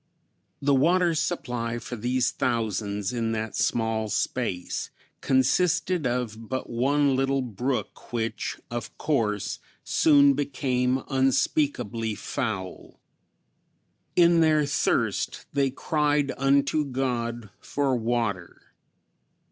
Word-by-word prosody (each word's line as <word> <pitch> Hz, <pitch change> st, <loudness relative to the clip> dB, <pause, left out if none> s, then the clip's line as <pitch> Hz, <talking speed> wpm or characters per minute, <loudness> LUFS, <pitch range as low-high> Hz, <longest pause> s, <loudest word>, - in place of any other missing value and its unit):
The 140 Hz, 0 st, +3 dB
water 170 Hz, +5 st, +3 dB
supply 125 Hz, -8 st, -2 dB
for 120 Hz, +1 st, -6 dB
these 125 Hz, +3 st, 0 dB
thousands 105 Hz, -3 st, -1 dB
in 115 Hz, -2 st, -1 dB
that 110 Hz, -1 st, -3 dB
small 110 Hz, -1 st, 0 dB
space 105 Hz, -3 st, -2 dB, 0.3 s
consisted 165 Hz, +4 st, +2 dB
of 115 Hz, -3 st, -3 dB
but 130 Hz, 0 st, -3 dB
one 140 Hz, +3 st, +2 dB
little 135 Hz, 0 st, +1 dB
brook 125 Hz, +3 st, -4 dB
which 115 Hz, -1 st, -3 dB
of 120 Hz, 0 st, -5 dB
course 110 Hz, -9 st, -1 dB, 0.2 s
soon 140 Hz, -2 st, +5 dB
became 130 Hz, -2 st, 0 dB
unspeakably 130 Hz, -4 st, 0 dB
foul. 105 Hz, -5 st, -5 dB, 1.2 s
In 170 Hz, -1 st, +5 dB
their 155 Hz, -2 st, +4 dB
thirst 140 Hz, -, 0 dB
they 140 Hz, -1 st, +2 dB
cried 145 Hz, 0 st, 0 dB
unto 140 Hz, +2 st, +2 dB
God 120 Hz, -5 st, -3 dB
for 140 Hz, -2 st, 0 dB
water. 115 Hz, -6 st, -2 dB
125 Hz, 100 wpm, -26 LUFS, 115-140 Hz, 1.2 s, soon